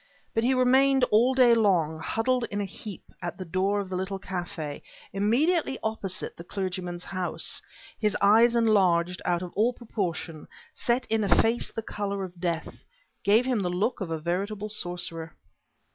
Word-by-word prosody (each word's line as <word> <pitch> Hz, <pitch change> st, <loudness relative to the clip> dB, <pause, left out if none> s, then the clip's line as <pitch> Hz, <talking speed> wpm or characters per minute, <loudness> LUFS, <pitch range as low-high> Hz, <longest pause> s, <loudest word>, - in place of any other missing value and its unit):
But 225 Hz, -, +1 dB
he 260 Hz, +2 st, +3 dB
remained 265 Hz, +1 st, +4 dB
all 240 Hz, +5 st, +4 dB
day 250 Hz, -2 st, +6 dB
long, 175 Hz, -8 st, +2 dB
huddled 235 Hz, +8 st, 0 dB
in 205 Hz, -, -3 dB
a 205 Hz, -, -1 dB
heap 195 Hz, +1 st, -9 dB, 0.2 s
at 175 Hz, 0 st, -4 dB
the 185 Hz, -, -6 dB
door 190 Hz, +4 st, 0 dB
of 200 Hz, -, -3 dB
the 185 Hz, -, -4 dB
little 190 Hz, +1 st, -2 dB
café 175 Hz, -6 st, -5 dB, 0.3 s
immediately 270 Hz, -, +2 dB
opposite 210 Hz, -4 st, -3 dB
the 170 Hz, -, -9 dB
clergyman's 180 Hz, -2 st, -4 dB
house, 185 Hz, -2 st, -2 dB, 0.4 s
his 210 Hz, -2 st, +1 dB
eyes 225 Hz, +4 st, +5 dB
enlarged 185 Hz, -6 st, +3 dB
out 175 Hz, 0 st, +1 dB
of 180 Hz, -, -7 dB
all 230 Hz, +4 st, +3 dB
proportion, 175 Hz, -9 st, -4 dB, 0.3 s
set 245 Hz, +2 st, 0 dB
in 220 Hz, -1 st, 0 dB
a 190 Hz, -4 st, +4 dB
face 230 Hz, +2 st, +1 dB
the 225 Hz, -, -5 dB
color 200 Hz, -2 st, -3 dB
of 180 Hz, -2 st, -9 dB
death, 170 Hz, -3 st, -3 dB, 0.4 s
gave 220 Hz, +5 st, +4 dB
him 255 Hz, -4 st, +1 dB
the 180 Hz, -3 st, -1 dB
look 200 Hz, +7 st, -1 dB
of 185 Hz, -, -3 dB
a 165 Hz, -, -1 dB
veritable 195 Hz, +6 st, -2 dB
sorcerer. 175 Hz, -5 st, -4 dB
200 Hz, 170 wpm, -27 LUFS, 180-225 Hz, 0.4 s, day